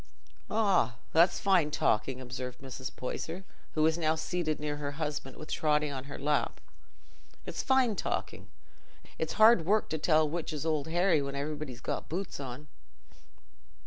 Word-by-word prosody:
'" - - -33
"Ah, 200 - +2 0.2
it's 170 +2 +5
fine 185 -6 +3
talking," 130 -2 +1
observed 125 0 -6
Mrs. 130 -1 -6
Poyser, 165 +8 -4 0.3
who 155 - +3
was 160 +2 +3
now 160 -1 +2
seated 160 -1 -1
near 150 -1 -2
her 145 -1 -4
husband, 145 -3 -4
with 155 - -6
Totty 150 -1 +2
on 135 -1 -5
her 145 - -7
lap—"it's 150 +1 -5
fine 260 -5 +3
talking. - - -3 0.7
It's - - -1
hard 220 -4 +7
work 210 +6 +2
to 160 - -2
tell 155 0 +4
which 160 +1 -3
is 150 0 -4
Old 155 -3 0
Harry 175 -1 +3
when 140 0 -4
everybody's 145 -3 -4
got - - -3
boots 185 0 -4
on." 135 +2 -7
155 Hz, 155 wpm, -31 LUFS, 140-170 Hz, 0.7 s, hard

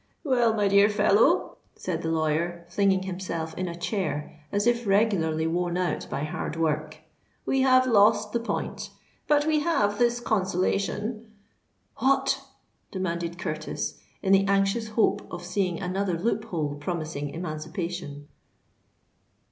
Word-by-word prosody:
"Well, 240 -6 +3
my 205 -2 +2
dear 200 +1 +5
fellow," 210 - +3 0.2
said 170 -3 -3
the 160 - -2
lawyer, 165 +2 0
flinging 190 +1 +2
himself 180 -4 -4
in 185 - -2
a 170 - -5
chair 170 -5 -3
as 205 +1 0
if 240 -1 +1
regularly 195 -6 +2
worn 175 +1 0
out 180 -1 -1
by 140 - -3
hard 150 +1 -4
work, 155 -1 -1 0.5
"we 270 - +2
have 255 -1 +5
lost 215 -2 +4
the 235 - 0
point; 230 - -4 0.4
but 295 0 +3
we 310 -1 +3
have 210 -11 +1
this 240 0 +3
consolation——" 205 +2 -1 0.7
"What?" 270 0 +2 0.5
demanded 170 -2 -3
Curtis, 155 -3 -4 0.2
in 195 -1 +3
the 195 0 +4
anxious 200 +3 +2
hope 215 +1 +2
of 175 0 -6
seeing 180 -1 -1
another 185 -1 -1
loophole 175 -7 -1
promising 155 -2 -4
emancipation. 160 -1 -5
190 Hz, 130 wpm, -26 LUFS, 165-215 Hz, 0.7 s, dear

